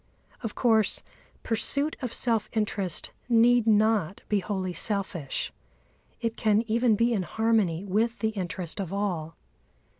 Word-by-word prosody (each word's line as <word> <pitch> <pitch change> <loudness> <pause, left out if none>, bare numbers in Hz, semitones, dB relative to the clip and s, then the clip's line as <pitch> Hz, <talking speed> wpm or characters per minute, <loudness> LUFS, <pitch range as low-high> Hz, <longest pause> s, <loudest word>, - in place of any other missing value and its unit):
Of 225 -5 -5
course, 220 -3 +3 0.4
pursuit 280 +6 0
of 250 -3 -3
self 230 -2 0
interest 205 -5 -2 0.2
need 235 0 +5
not 210 -4 +3
be 210 - +3
wholly 190 -2 -3
selfish; 190 - -3 0.7
it 230 -1 -2
can 215 0 +2
even 230 0 +2
be 235 +3 +2
in 205 - +1
harmony 205 -3 +1
with 220 +4 +1
the 220 - 0
interest 185 -3 -4
of 185 -3 -5
all. 175 -6 -2
215 Hz, 130 wpm, -27 LUFS, 190-230 Hz, 0.7 s, need